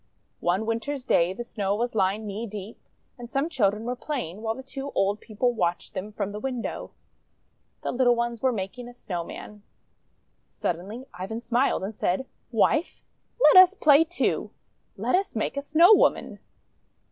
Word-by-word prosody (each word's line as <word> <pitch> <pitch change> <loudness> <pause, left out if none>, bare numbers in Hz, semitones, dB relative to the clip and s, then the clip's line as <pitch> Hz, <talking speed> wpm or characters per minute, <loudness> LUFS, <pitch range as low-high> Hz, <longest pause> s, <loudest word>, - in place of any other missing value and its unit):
One 185 +5 0
Winter's 250 +4 -3
day 170 +1 +3
the 240 +5 -5
Snow 200 -4 -2
was 240 +3 -2
lying 205 +1 +1
knee 210 +3 -4
deep, 210 +1 -8 0.4
and 240 -1 -8
some 275 +6 -1
children 215 -8 +1
were 245 +2 -2
playing, 240 - -5
while 225 0 -2
the 265 - -9
two 270 +1 -6
old 200 +2 +1
people 240 +3 -1
watched 175 -6 -2
them 195 +2 -5
from 205 -1 -3
the 210 - -6
window. 250 -1 -4 0.9
The - - -1
little 245 -1 +3
ones 235 -1 -2
were 260 - +3
making 230 +3 -5
a 245 - -14
Snow 175 -7 -4
man. 210 +4 -10 0.9
Suddenly 195 +9 -4
Ivan 190 +6 -5
smiled, 240 -2 +1
and 205 +3 -5
said: 190 +9 0 0.2
— - - -43
"Wife, 315 +3 -1 0.4
let - - +7
us 370 +2 +4
play, 300 -4 +6
too. 350 +3 -1 0.5
Let - - -1
us 385 -4 +1
make 220 - -1
a 280 - -1
Snow 330 +7 +6
woman." - - +2
230 Hz, 170 wpm, -26 LUFS, 200-265 Hz, 0.9 s, let